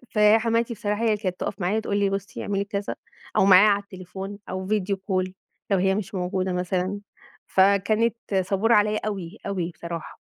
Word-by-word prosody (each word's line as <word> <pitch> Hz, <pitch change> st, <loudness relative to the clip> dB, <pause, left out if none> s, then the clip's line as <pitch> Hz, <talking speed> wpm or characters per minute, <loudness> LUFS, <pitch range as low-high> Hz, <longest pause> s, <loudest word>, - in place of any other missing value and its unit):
فحماتي 225 Hz, +2 st, +4 dB
بصراحة 210 Hz, 0 st, -2 dB
هي -, -, +2 dB
اللي 215 Hz, -2 st, +3 dB
كانت 185 Hz, -3 st, -3 dB
تقف -, -, -4 dB
معايا 200 Hz, +5 st, +1 dB
تقول 205 Hz, -2 st, -2 dB
لي: 200 Hz, -1 st, +2 dB
"بُصي 195 Hz, +1 st, -4 dB
اعملي 200 Hz, 0 st, -1 dB
كذا" 200 Hz, 0 st, -3 dB, 0.4 s
أو -, -, +5 dB
معايا 195 Hz, +2 st, +8 dB
على 200 Hz, 0 st, +2 dB
التليفون 190 Hz, +1 st, -8 dB
أو 185 Hz, 0 st, -4 dB
video 200 Hz, -2 st, 0 dB
call 185 Hz, -1 st, -2 dB, 0.4 s
لو 195 Hz, -, +4 dB
هي 190 Hz, +1 st, +2 dB
مش 200 Hz, -1 st, -4 dB
موجودة 185 Hz, 0 st, -1 dB
مثلًا. 180 Hz, +2 st, -1 dB, 0.5 s
فكانت 200 Hz, +4 st, +3 dB, 0.3 s
صبورة 205 Hz, +4 st, +2 dB
عليّا 210 Hz, +1 st, +3 dB
أوي، 195 Hz, -1 st, -5 dB
أوي 180 Hz, -3 st, -2 dB
بصراحة. 170 Hz, -1 st, -7 dB
200 Hz, 175 wpm, -25 LUFS, 185-210 Hz, 0.5 s, معايا